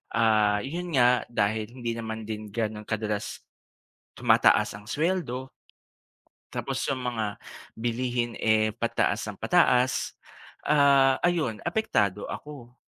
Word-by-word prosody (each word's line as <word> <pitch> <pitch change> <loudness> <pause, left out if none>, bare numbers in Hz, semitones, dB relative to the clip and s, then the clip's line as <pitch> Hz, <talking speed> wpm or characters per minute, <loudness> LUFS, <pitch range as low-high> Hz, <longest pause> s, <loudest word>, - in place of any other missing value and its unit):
ah, 110 -2 +3
yun 170 +7 -4
nga, 125 -1 +4
dahil 110 -1 0
hindi 120 -2 -3
naman 110 -1 -5
din 110 0 -6
ganon 105 0 -4
kadalas, 105 -1 -3 0.7
tumataas - - +3
ang 105 0 -12
sweldo, 150 -6 -1 1.0
tapos - - -3
yung 130 -2 -2
mga 110 -3 -3 0.4
bilihin 120 0 -1
eh, 110 -1 +2
pataas 115 +1 0
ng - - -12
pataas, 125 0 +2 0.5
ah, 140 -2 +5
ayun 160 -12 0
apektado 105 - 0
ako. 135 -5 -9
115 Hz, 110 wpm, -27 LUFS, 110-130 Hz, 1.0 s, ah